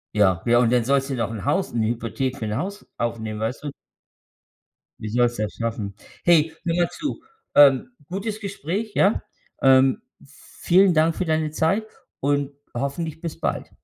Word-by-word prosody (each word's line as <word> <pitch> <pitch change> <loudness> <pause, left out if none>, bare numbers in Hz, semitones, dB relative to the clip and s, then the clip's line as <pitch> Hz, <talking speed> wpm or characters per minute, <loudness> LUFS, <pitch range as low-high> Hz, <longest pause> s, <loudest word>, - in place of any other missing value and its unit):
Ja, 95 -5 +3
ja, 120 0 +4
und 120 -2 +3
dann 120 -2 +3
sollst 135 +2 +1
du - - -2
noch 115 -2 -2
‘n 105 -4 -6
Haus 190 0 0
'ne 110 -2 +1
Hypothek 120 +3 -2
für 115 - -6
‘n 105 +1 -2
Haus 200 +6 -5
aufnehmen, 110 -2 -3
weißt 115 +7 -3
du? 145 - -4 1.3
Wie 110 - -5
sollst 120 0 +1
das 105 -1 -2
schaffen? 110 -4 -4 0.3
Hey, 160 -2 +4
hör 170 -1 0
mal 175 -1 +2
zu, 310 -3 -5 0.3
ähm, 145 - +6 0.2
gutes 205 +4 -4
Gespräch, 200 +2 -4
ja? 200 +3 +3 0.4
Ähm, 130 0 +5 0.2
vielen 185 +1 +2
Dank 160 +1 +3
für 185 - -2
deine 155 -1 0
Zeit 190 +8 +1 0.3
und 145 0 0 0.2
hoffentlich 140 +5 -3
bis 165 -3 -6
bald. - - -2
140 Hz, 170 wpm, -23 LUFS, 115-175 Hz, 1.3 s, ähm